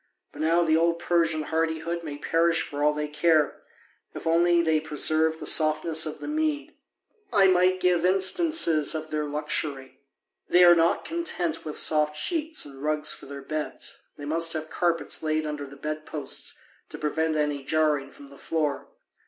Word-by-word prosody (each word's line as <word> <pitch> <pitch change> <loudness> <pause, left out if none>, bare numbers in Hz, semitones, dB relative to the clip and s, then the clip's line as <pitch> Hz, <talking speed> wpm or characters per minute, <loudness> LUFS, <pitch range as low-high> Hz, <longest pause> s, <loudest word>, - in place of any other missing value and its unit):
But - - -9
now 165 +2 +3
the 160 -1 +2
old 170 +1 +2
Persian 165 -2 0
hardihood 160 +1 -2
may 145 -3 -6
perish 165 +2 +1
for 145 0 -6
all 150 - +4
they 150 0 -3
care, 150 0 +1 0.5
if - - -8
only 170 +1 +3
they 160 -1 +2
preserve 155 +1 +1
the - - -7
softness 155 0 +2
of 155 - -6
the - - -8
Mede. 305 -1 -2 0.6
I 200 -4 +5
might 185 0 +3
give 180 -2 +2
instances 185 - +2
of 155 0 -5
their 150 -1 -1
luxury. 145 -2 -4 0.5
They 180 0 +6
are 175 -1 +9
not 165 0 +2
content 180 - -3
with 155 - -2
soft 150 -1 +2
sheets 315 - 0
and 135 -2 -11
rugs 150 0 +1
for - - -11
their 140 0 -8
beds, 155 +1 -4 0.2
they 145 - -8
must 165 +2 +1
have 155 -1 -5
carpets 170 -2 -1
laid 155 0 -1
under 150 -2 -5
the 140 - -12
bed 155 +1 -5
posts 145 -3 -4 0.3
to - - -7
prevent 160 +1 -1
any 150 -2 -1
jarring 150 -2 +1
from 140 0 -15
the 140 - -15
floor. 155 -3 -2
155 Hz, 175 wpm, -26 LUFS, 150-170 Hz, 0.6 s, are